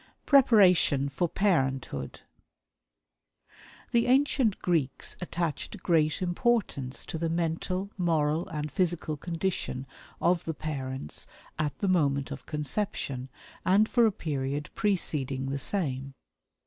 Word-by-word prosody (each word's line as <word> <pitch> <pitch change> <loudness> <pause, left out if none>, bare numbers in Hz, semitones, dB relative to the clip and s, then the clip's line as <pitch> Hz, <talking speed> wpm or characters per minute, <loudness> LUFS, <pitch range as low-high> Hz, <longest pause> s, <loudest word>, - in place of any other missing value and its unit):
Preparation 185 - +5
for 170 +5 -1
Parenthood. 135 - 0 1.7
The 235 0 +3
ancient 260 -4 +3
Greeks 160 -7 0
attached 175 +3 -3
great 160 0 +2
importance 175 - 0
to 160 - -5
the 165 0 0
mental, 170 +4 -1
moral 160 -1 +1
and 150 -4 -4
physical 175 -4 0
condition 165 -4 -3 0.3
of 175 0 +2
the 160 - -3
parents 130 - -5 0.3
at 150 -2 -1
the 200 - -1
moment 145 -6 +2
of 135 -1 -7
conception, 150 -4 -3 0.3
and 200 +4 +4
for 235 -1 +4
a - - +2
period 145 -5 -3
preceding 140 - 0
the 140 - -1
same. 135 -5 -1
160 Hz, 110 wpm, -28 LUFS, 140-185 Hz, 1.7 s, Preparation